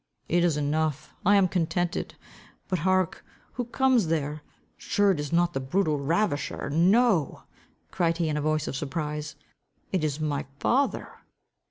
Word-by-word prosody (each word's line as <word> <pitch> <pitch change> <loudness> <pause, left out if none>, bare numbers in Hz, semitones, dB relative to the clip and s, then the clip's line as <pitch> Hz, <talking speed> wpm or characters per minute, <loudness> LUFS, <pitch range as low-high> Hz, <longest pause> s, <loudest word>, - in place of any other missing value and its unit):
"It 175 +1 +2
is 165 -4 +2
enough. 150 0 -1
I 205 +2 +5
am 195 -2 +5
contented. 175 0 -1 0.5
But 185 -2 -1
hark! 185 +1 +1 0.3
who 245 - -3
comes 250 -4 +2
there? 150 -2 -1 0.3
Sure 205 -1 +2
it 175 - -1
is 145 +1 -4
not 175 +1 +2
the 135 - -1
brutal 150 +3 0
ravisher? 145 -2 -1
No," 185 - +3 0.5
cried 165 -2 +1
he, 170 -2 0
in 150 - -1
a 150 - -1
voice 155 0 0
of - - -3
surprise, 150 +1 -4 0.6
"it 185 -5 0
is 150 -1 -1
my 145 -4 -2
father." 270 - +1
165 Hz, 155 wpm, -27 LUFS, 150-185 Hz, 0.6 s, I